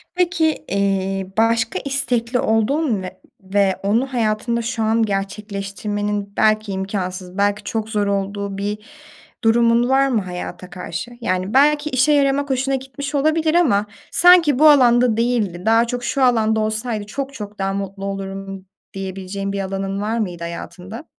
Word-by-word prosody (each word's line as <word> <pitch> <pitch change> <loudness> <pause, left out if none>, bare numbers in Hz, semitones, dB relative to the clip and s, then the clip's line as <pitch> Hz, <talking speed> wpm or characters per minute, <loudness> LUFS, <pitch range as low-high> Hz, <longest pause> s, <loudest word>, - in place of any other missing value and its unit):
Peki, 335 -3 +1
eee, 195 -1 0
başka 225 0 +2
istekli 245 -3 0
olduğun 225 +1 +1
ve 185 0 -8 0.2
ve 195 0 +1
onu 235 +7 0
hayatında 235 0 0
şu 230 -1 -2
an 225 +1 +2
gerçekleştirmenin 200 0 -3
belki 215 -1 +2
imkânsız, 190 -1 -4
belki 205 +1 +1
çok 220 +1 -3
zor 210 -2 0
olduğu 200 0 -2
bir 205 +1 -2 0.7
durumun 235 +1 +3
var 270 +1 +4
mı 240 -5 +1
hayata 180 -1 -7
karşı? 180 +3 -6
Yani, 185 -1 -1
belki 295 +2 +4
işe 255 +2 +2
yaramak 280 0 +2
hoşuna 265 +1 0
gitmiş 270 +2 -6
olabilir 310 +3 +2
ama 240 -13 +3 0.3
sanki 340 -6 +6
bu 310 0 +8
alanda 245 -5 +5
değildi, 225 -7 0
daha 225 +1 +4
çok 245 0 -4
şu 275 +2 0
alanda 220 -3 +3
olsaydı 215 0 -2
çok 275 +6 -5
çok 210 -4 -8
daha 195 0 -1
mutlu 195 0 -5
olurum 195 -1 -6 0.3
diyebileceğin 195 +1 -5
bir 200 - -3
alanın 195 0 -3
var 220 +2 -1
mıydı 175 -5 -3
hayatında? 180 - -7
215 Hz, 145 wpm, -20 LUFS, 195-250 Hz, 0.7 s, bu